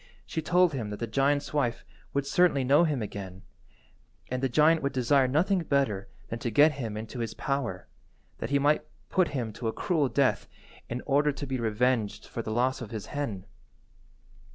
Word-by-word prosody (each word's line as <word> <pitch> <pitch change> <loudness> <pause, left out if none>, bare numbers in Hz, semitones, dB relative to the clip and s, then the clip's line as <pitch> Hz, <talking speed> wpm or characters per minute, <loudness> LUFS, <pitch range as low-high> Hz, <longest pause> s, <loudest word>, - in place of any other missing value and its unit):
She 160 - -3
told 175 +1 +3
him 115 -6 -3
that 105 - -5
the 115 - -1
giant's 140 +6 +1
wife 125 -6 0 0.3
would 140 0 -1
certainly 170 -3 +3
know 145 +6 +5
him 145 -8 -1
again, 95 -2 -7 0.9
and 130 0 -1
the 135 - +1
giant 155 +5 +4
would 140 - -1
desire 130 +1 +3
nothing 175 +9 +2
better 135 - 0 0.2
than 115 - -4
to 120 - -2
get 145 +7 +6
him 115 -7 -5
into 110 +3 -6
his 115 -2 -3
power, 125 -10 -3 0.5
that - - -4
he 140 - +3
might 145 +2 +2 0.3
put 185 -2 +3
him 115 -4 -3
to 115 - -4
a - - +1
cruel 155 -7 0
death 130 -7 +1 0.4
in 120 +1 -3
order 145 +2 +3
to 140 - -6
be 130 -2 -3
revenged 110 -1 0
for 115 - -5
the 110 - -6
loss 125 +4 +1
of 115 - -6
his 110 -2 -5
hen. 115 -10 -3
130 Hz, 190 wpm, -28 LUFS, 115-145 Hz, 0.9 s, get